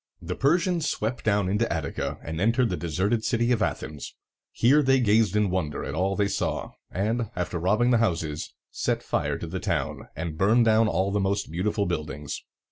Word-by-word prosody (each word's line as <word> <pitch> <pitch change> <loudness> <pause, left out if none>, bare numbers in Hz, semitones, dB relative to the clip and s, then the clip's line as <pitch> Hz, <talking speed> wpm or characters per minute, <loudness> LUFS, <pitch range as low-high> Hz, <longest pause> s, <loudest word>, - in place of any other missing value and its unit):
The 85 +1 -4
Persians 170 - +1
swept 115 +3 -2
down 100 -3 +2
into 105 +5 0
Attica, 80 -4 -3
and 80 +2 -4
entered 115 +3 +3
the - - 0
deserted 95 +7 0
city 120 0 +1
of 115 -3 +2
Athens. 75 -6 -3 0.4
Here 140 +6 +4
they 135 -1 +4
gazed 110 -3 +3
in 105 -3 +2
wonder 80 -6 -2
at - - -4
all 95 +4 0
they 100 0 +2
saw, 100 - -2 0.2
and, 110 +4 -1
after 90 -1 -2
robbing 105 +8 +2
the 120 - +4
houses, 80 -8 -1 0.2
set - - -1
fire - - -1
to - - -6
the - - -4
town, - - -2
and 80 -1 -5
burned 115 +5 +4
down 110 0 +4
all 95 +1 0
the 100 - +1
most 100 -2 -1
beautiful 100 +4 0
buildings. 75 -4 -4
100 Hz, 190 wpm, -26 LUFS, 85-115 Hz, 0.4 s, Here